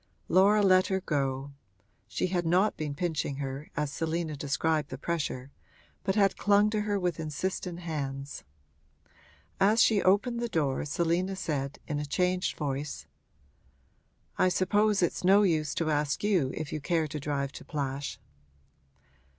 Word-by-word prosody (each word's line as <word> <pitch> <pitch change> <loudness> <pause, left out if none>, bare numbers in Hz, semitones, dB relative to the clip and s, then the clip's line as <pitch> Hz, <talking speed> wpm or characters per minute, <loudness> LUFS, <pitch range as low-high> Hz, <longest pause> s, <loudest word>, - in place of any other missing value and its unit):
Laura 205 +3 +5
let 185 -1 +5
her 190 -1 0
go; 140 -5 -2 0.6
she - - -1
had 180 -1 0
not 180 +5 +2
been 150 -2 -4
pinching 155 -3 -2
her, 135 +1 -5
as 150 -2 -1
Selina 165 -1 -2
described 150 +1 0
the 130 - -6
pressure, 140 -4 -3 0.5
but 190 0 0
had 200 -2 +3
clung 205 +1 +4
to 215 -1 0
her 205 -1 0
with 175 -3 -1
insistent 170 +3 -3
hands. 140 -4 -5 1.2
As 205 +4 +4
she 210 -3 +3
opened 215 +6 +2
the 235 0 -2
door 145 -9 0
Selina 170 +5 0
said, 145 -6 -3
in 150 -1 -2
a 150 - -3
changed 180 +4 0
voice: 145 0 -3 1.3
'I 185 - +5
suppose 205 +2 +2
it's 175 - -1
no 195 +3 +6
use 155 -6 +1
to 160 -2 0
ask 150 +2 0
you 185 -10 +2
if 155 - -5
you 155 - -3
care 165 +1 +1
to 150 0 -5
drive 140 -1 -2
to - - -10
Plash.' 140 -2 -4
165 Hz, 150 wpm, -29 LUFS, 145-190 Hz, 1.3 s, no